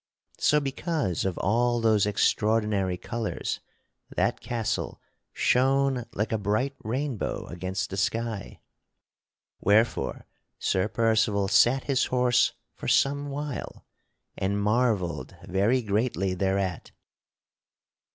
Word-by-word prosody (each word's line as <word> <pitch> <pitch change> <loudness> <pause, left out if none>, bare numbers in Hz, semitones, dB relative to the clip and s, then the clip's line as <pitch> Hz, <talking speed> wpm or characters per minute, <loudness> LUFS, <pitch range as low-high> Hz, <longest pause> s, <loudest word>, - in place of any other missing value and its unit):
So 150 - +4
because 140 - -2
of 95 -2 -1
all 120 +5 +2
those 110 -3 +3
extraordinary 105 -2 +1
colors, 115 +4 -3 0.5
that - - 0
castle 115 -3 -2 0.3
shone 135 -1 +2
like 105 +2 -1
a 110 - 0
bright 110 +7 0
rainbow 130 +1 -2
against 95 +2 -4
the 95 - -4
sky, 115 0 -2 1.0
wherefore 110 +3 +2 0.3
Sir 95 +1 +1
Percival 110 -3 +2
sat 120 +7 +4
his 135 -2 +1
horse 125 -1 +3 0.2
for - - -8
some 140 +1 +2
while 145 -1 -5 0.5
and 100 +2 -1
marvelled 105 -4 0
very 105 +8 +2
greatly 100 -3 0
thereat. 95 -1 -1
110 Hz, 105 wpm, -27 LUFS, 100-125 Hz, 1.0 s, So